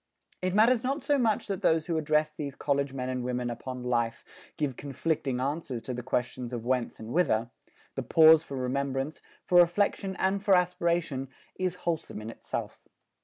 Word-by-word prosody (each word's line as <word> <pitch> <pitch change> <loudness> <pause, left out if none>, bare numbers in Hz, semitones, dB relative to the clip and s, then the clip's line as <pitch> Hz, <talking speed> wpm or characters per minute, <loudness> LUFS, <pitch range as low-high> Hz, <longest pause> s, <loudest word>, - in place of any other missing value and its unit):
It 185 +1 -1
matters 230 +3 +5
not 275 +3 -1
so 285 -1 +2
much 225 -4 +1
that 195 -3 -3
those 160 -1 +3
who 170 - -1
address 155 0 +1
these 145 -3 -5
college 140 -1 0
men 130 -1 -4
and 130 -1 -2
women 125 -1 -2
upon 125 +2 -6
life, 120 -2 -1 0.3
give 145 -5 -1
conflicting 140 -1 -2
answers 135 -2 -2
to 130 - -4
the 125 - -4
questions 125 0 -2
of 120 -1 -4
whence 125 -1 -1
and 110 - -8
whither: 120 -9 +2 0.4
the - - -3
pause 160 -1 +7
for 140 -4 -7
remembrance, 135 +3 -2 0.2
for 175 - +5
reflection 190 +2 +2
and 190 +2 0
for 200 -2 +5
aspiration 170 -6 0 0.3
is 185 -1 0
wholesome 165 -9 -2
in 110 +1 -6
itself. - - -6
145 Hz, 175 wpm, -29 LUFS, 125-175 Hz, 0.4 s, pause